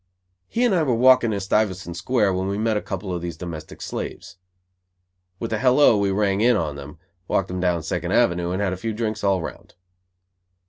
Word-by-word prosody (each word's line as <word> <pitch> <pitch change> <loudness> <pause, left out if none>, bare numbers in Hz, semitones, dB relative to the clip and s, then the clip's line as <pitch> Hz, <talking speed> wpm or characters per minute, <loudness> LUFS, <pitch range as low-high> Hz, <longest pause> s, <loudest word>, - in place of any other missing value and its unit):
He 240 - -1
and 235 - +2
I 175 - +3
were 130 -6 +1
walking 125 -1 +5
in 100 - -1
Stuyvesant 95 -3 -1
Square 105 -2 +1
when 95 +1 -2
we 100 +1 -2
met 110 +1 0
a 105 - 0
couple 95 -1 -5
of 85 - -3
these 85 -2 -5
domestic 80 -3 -8
slaves. - - -6 1.0
With 115 -1 -3
a 110 - 0
"hello," 130 0 +5
we 100 -1 +1
rang 100 0 +1
in 120 +2 +4
on 75 -3 -2
them, 70 +2 -10 0.3
walked 95 - 0
them 90 0 -4
down 90 -3 0
Second - - -3
Avenue 85 0 +2
and 95 +3 -1
had 95 -2 0
a - - -5
few 110 +4 -3
drinks 110 -1 -3
all 100 -2 +2
around. 85 - -8
100 Hz, 210 wpm, -23 LUFS, 90-110 Hz, 1.0 s, walking